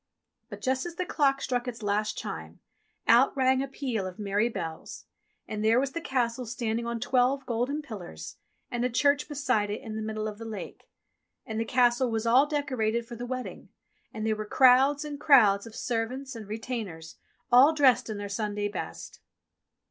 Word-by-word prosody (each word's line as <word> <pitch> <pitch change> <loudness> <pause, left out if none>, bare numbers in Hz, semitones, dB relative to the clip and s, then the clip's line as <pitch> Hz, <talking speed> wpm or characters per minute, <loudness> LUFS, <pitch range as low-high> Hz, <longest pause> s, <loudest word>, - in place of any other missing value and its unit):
But - - -9
just 260 +4 0
as 340 - -8
the 365 +1 -2
clock 275 -5 +1
struck 245 -1 -1
its 235 -2 -6
last 210 +1 0
chime, 80 +1 -6 0.5
out 245 +4 +5
rang 260 0 +3
a 275 - -2
peal 250 -8 -3
of 185 - -9
merry 205 +2 0
bells, 165 -8 -6 0.4
and 215 0 -4
there 225 +3 +4
was 270 +1 -1
the 335 - -4
Castle 250 -5 -1
standing 235 0 -2
on 235 0 -3
twelve 255 +3 +1
golden 255 +5 -1
pillars 175 - -8 0.3
and 240 0 -1
a 250 - +1
church 285 +2 +2
beside 255 -8 0
it 210 +3 -3
in 220 -4 -7
the 220 - -3
middle 215 0 -3
of 210 0 -7
the 230 - -7
lake. 220 -2 -8 0.6
And 220 0 -4
the 225 - 0
Castle 245 +1 +3
was 225 0 -2
all 255 +5 +5
decorated 255 -6 -1
for 235 0 -9
the 245 +2 -6
wedding, 255 0 -6 0.4
and 215 0 -5
there 220 -1 +1
were 215 - -4
crowds 270 +5 +5
and 290 -1 -6
crowds 220 -9 +5
of 225 - -12
servants 250 +3 -3
and 220 -3 -8
retainers, 210 -7 -6 0.3
all 255 +5 +8
dressed 275 -7 +3
in 215 - -4
their 205 0 -5
Sunday 205 0 -2
best. 205 - -7
235 Hz, 185 wpm, -28 LUFS, 215-265 Hz, 0.6 s, all